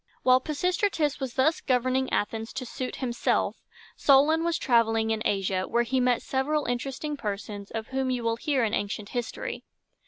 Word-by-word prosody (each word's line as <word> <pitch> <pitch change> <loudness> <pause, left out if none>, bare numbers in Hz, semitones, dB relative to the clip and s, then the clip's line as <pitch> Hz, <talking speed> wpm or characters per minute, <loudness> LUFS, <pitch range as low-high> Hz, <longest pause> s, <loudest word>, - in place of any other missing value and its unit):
While 255 0 +6
Pisistratus 325 0 0
was 265 -3 -4
thus 300 +5 +2
governing 255 0 +1
Athens 225 +2 -2
to 260 -1 -4
suit 255 +1 -5
himself, 240 -2 0 0.4
Solon 295 +4 +4
was 335 0 +1
traveling 225 -3 +2
in 220 -1 -1
Asia, 190 -1 0
where 240 0 +2
he 260 +2 0
met 250 -1 +2
several 290 +3 0
interesting 270 +5 -3
persons 205 -4 -5
of 220 -1 -5
whom 265 0 -1
you 250 -2 -1
will 230 0 0
hear 275 -1 0
in 220 -1 0
ancient 205 +1 -2
history. 240 -2 -4
255 Hz, 165 wpm, -27 LUFS, 225-275 Hz, 0.4 s, While